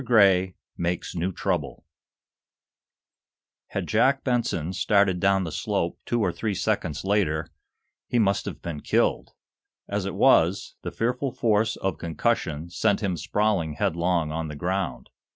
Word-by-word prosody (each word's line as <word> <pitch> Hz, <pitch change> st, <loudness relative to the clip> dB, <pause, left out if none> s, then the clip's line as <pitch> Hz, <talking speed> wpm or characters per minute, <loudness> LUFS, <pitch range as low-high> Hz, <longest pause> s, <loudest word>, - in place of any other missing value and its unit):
GRAY" 95 Hz, -6 st, +4 dB, 0.2 s
MAKES 85 Hz, 0 st, -2 dB
NEW 90 Hz, +2 st, -1 dB
TROUBLE -, -, -3 dB, 1.8 s
Had -, -, -3 dB
Jack 135 Hz, 0 st, +2 dB
Benson 115 Hz, -, 0 dB
started 100 Hz, -1 st, +2 dB
down 95 Hz, 0 st, +3 dB
the 80 Hz, -, -4 dB
slope -, -, -2 dB
two 120 Hz, -1 st, +1 dB
or 90 Hz, -, +1 dB
three 100 Hz, +4 st, -2 dB
seconds 80 Hz, -2 st, -1 dB
later 85 Hz, -6 st, 0 dB, 0.6 s
he 120 Hz, -, 0 dB
must 100 Hz, -4 st, +2 dB
have -, -, -7 dB
been 85 Hz, -3 st, -4 dB
killed. -, -, 0 dB, 0.5 s
As 100 Hz, -1 st, -2 dB
it 95 Hz, -, -4 dB
was, 95 Hz, -5 st, +3 dB
the -, -, -4 dB
fearful 125 Hz, +3 st, -1 dB
force 110 Hz, -3 st, +1 dB
of 95 Hz, -3 st, -3 dB
concussion 85 Hz, -3 st, -1 dB
sent 100 Hz, +4 st, +1 dB
him 95 Hz, -3 st, 0 dB
sprawling 100 Hz, -3 st, 0 dB
headlong 85 Hz, 0 st, 0 dB
on 80 Hz, 0 st, -3 dB
the 75 Hz, -, -7 dB
ground. 90 Hz, -2 st, -2 dB
95 Hz, 140 wpm, -25 LUFS, 85-105 Hz, 1.8 s, GRAY